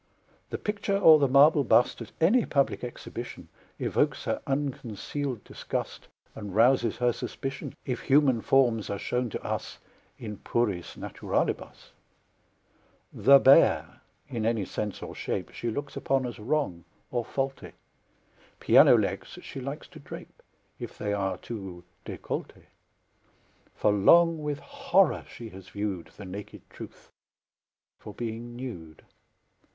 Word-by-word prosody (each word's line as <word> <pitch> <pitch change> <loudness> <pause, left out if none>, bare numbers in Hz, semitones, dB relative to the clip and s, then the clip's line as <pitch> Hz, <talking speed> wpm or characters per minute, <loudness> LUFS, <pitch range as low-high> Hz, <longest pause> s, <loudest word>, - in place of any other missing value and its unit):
The - - -3
picture 205 -1 -1
or 160 -6 +8
the 140 - +3
marble 140 +3 +6
bust 120 -1 +3
At 115 - -8
any 215 +9 +4
public 140 -3 0
exhibition 125 - -7 0.3
Evokes - - 0
her - - -2
unconcealed 135 -2 -3
disgust - - -5 0.3
And 105 -3 -7
rouses 120 -1 +4
her 120 0 +2
suspicion, 135 +3 -5
If 125 -2 -2
human 135 -4 +4
forms 120 -5 +2
are 100 - -2
shown 125 +4 -1
to - - -6
us - - -4 0.4
In 105 -3 -7
puris 105 -8 -2
naturalibus. - - -3 1.2
The 140 0 +7
bare, 135 0 +5 0.3
in 115 -3 -3
any 110 -3 +1
sense 105 +1 -4
or - - -7
shape. - - -4
She 120 - -4
looks 140 +5 -5
upon 135 -1 0
as 120 -2 -6
wrong 110 - -1 0.3
or 120 -1 0
faulty; 135 +3 -4 0.9
Piano - - +7
legs - - -2
she 135 - -7
likes 140 +4 -6
to - - -13
drape, - - -11 0.4
If - - -7
they 105 0 -2
are 95 -2 -1
too 95 -5 -8 0.2
décoll'té; - - -5 1.1
For 105 - +2
long 165 - +5
with 150 -1 -3
horror 275 -9 +2
she 115 -2 -9
has 95 -1 -12
viewed 100 -4 -4
The 100 - -8
naked 100 +3 -9
Truth, - - -12 0.9
for 105 - -10
being 120 +1 -5
nude. 90 -12 -8
120 Hz, 135 wpm, -28 LUFS, 105-140 Hz, 1.2 s, or